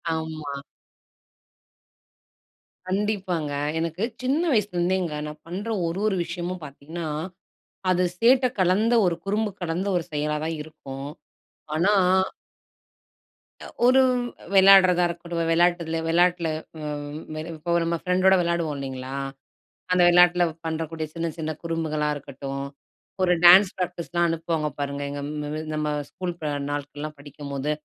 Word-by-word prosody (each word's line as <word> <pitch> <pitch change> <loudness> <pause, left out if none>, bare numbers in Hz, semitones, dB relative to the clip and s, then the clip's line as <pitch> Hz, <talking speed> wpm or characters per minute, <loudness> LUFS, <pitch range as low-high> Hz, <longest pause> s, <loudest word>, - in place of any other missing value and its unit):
ஆமா. 155 -3 -5 2.3
கண்டிப்பாங்க, 185 -6 -1 0.3
எனக்கு 165 +4 -3 0.2
சின்ன 275 +6 +1
வயசுலருந்தேங்க 185 -5 0
நான் 150 0 -9
பண்ற 195 +6 -5 0.2
ஒரு, 165 +3 -3
ஒரு 200 - +1
விஷயமும் 175 0 -5
பாத்தீங்கன்னா, 155 +4 -7 0.8
அது 180 0 +3
சேட்ட 255 +2 +5
கலந்த 200 +6 +3
ஒரு 170 - +1
குறும்பு 210 +2 0
கலந்த 175 +3 -2
ஒரு 170 - 0
செயலா 150 0 -1
தான் 160 0 -2
இருக்கும், 140 -3 -8 0.7
ஆனா 185 +7 +3 1.7
அ - - -8 0.2
ஒரு 260 +1 +6 0.5
வெளையாடுறதா 190 -2 +7
இருக்கட்டும், 170 0 -5
வெளையாட்டுல 170 -1 +2
வெளையாட்டுல 175 0 +3 0.3
அ - - -7 0.7
இப்ப 165 +2 -3
நம்ம 170 0 0
ஃப்ரெண்டோட 185 +1 +4
வெளையாடுவோம் 170 -3 0
இல்லைங்களா? 130 -1 -5 0.8
அந்த 180 - +3
வெளையாட்டுல 175 0 +6 0.2
பண்றக்கூடிய 160 0 -3
சின்ன 165 0 -2
சின்ன 160 -1 -3
குறும்புகளா 160 -2 -1
இருக்கட்டும், 140 -1 -6 0.6
ஒரு 180 -1 +4
டான்ஸ் 185 +2 +9
ப்ராக்டிஸ்லாம் 175 -1 -1
அனுப்புவாங்க 165 -2 -1
பாருங்க. 140 0 -3
எங்க 145 0 -5 0.2
ம 155 +1 -4
நம்ம 150 0 -1 0.2
ஸ்கூல் 180 -2 -5
ப - - -7 0.3
நாட்கள்லாம் 145 +1 -5
படிக்கும்போது 140 0 -5
170 Hz, 115 wpm, -25 LUFS, 150-180 Hz, 2.3 s, டான்ஸ்